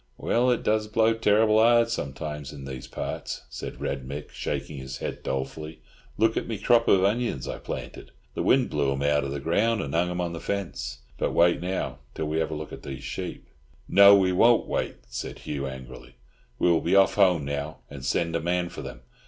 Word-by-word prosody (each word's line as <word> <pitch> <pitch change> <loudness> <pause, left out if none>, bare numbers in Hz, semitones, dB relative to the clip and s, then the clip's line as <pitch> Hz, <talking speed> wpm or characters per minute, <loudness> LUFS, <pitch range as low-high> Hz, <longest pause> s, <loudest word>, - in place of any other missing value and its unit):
"Well 125 +2 +2
it 125 - +1
does 110 0 +1
blow 110 +1 +3
terrible 110 0 +4
hard 115 0 +5
sometimes 75 - -4
in 70 -2 -9
these 65 -2 -7
parts," - - -5
said - - -7
Red 70 -1 -3
Mick, 70 +3 -7
shaking 75 - -4
his 65 0 -6
head - - -5
dolefully; 75 +4 -4 0.4
"look 110 +1 +3
at - - -2
me 115 - -3
crop 115 +3 +3
of 95 -1 +5
onions 105 - 0
I - - -5
planted—the - - -7
wind 130 -1 +3
blew 70 -2 +1
'em 70 +1 -3
out 75 0 +2
of 70 - -3
the 70 - -3
ground, 105 +10 +1
and 70 -8 -4
hung 85 +2 +2
'em 90 0 -3
on 85 -1 -2
the 85 - -5
fence. 100 -11 -4 0.2
But - - 0
wait 85 0 +4
now, 90 -8 -3 0.2
till 80 - -2
we 80 +1 -1
have 80 -1 0
a 80 - -4
look 75 0 -7
at - - -8
these 70 -1 -7
sheep." - - -5 0.4
"No, 100 0 +8
we 95 -2 +3
won't 115 +6 +4
wait," - - -2
said - - -6
Hugh 70 -2 -4
angrily. 65 -1 -10 0.4
"We - - +2
will 85 -2 +4
be 85 +3 +1
off 95 -2 +5
home 90 -7 +3
now, 70 +2 -4
and 70 -2 -10
send 85 +4 0
a 85 - 0
man 90 +1 0
for - - -8
them. 60 - -8
85 Hz, 210 wpm, -26 LUFS, 70-105 Hz, 0.4 s, No